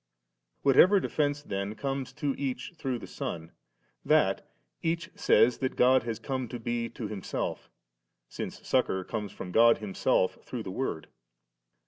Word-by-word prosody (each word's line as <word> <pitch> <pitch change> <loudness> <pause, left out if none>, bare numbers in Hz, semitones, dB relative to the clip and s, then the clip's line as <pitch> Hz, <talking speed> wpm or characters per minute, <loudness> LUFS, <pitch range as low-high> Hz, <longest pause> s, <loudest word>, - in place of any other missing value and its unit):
Whatever 180 +9 +6
defence 145 -4 0
then 100 -1 -3
comes 135 +1 -3
to 145 -2 -1
each 140 +5 -4
through 135 -6 -2
the 115 - -8
Son, 80 0 -5 0.5
that - - +2 0.3
each 170 +2 -1
says 125 - +4
that 130 - -1
God 130 +1 +5
has 115 -1 -3
come 130 +2 -3
to 120 +2 -6
be 115 0 -2
to 115 -5 -6
himself, 100 -3 -4 0.6
since - - -7
succour 95 0 +1
comes 105 0 -4
from 90 - -7
God 115 +3 +6
Himself 95 -2 0
through 120 -3 -5
the 95 - -5
Word. 95 -8 -3
120 Hz, 145 wpm, -29 LUFS, 105-135 Hz, 0.6 s, Whatever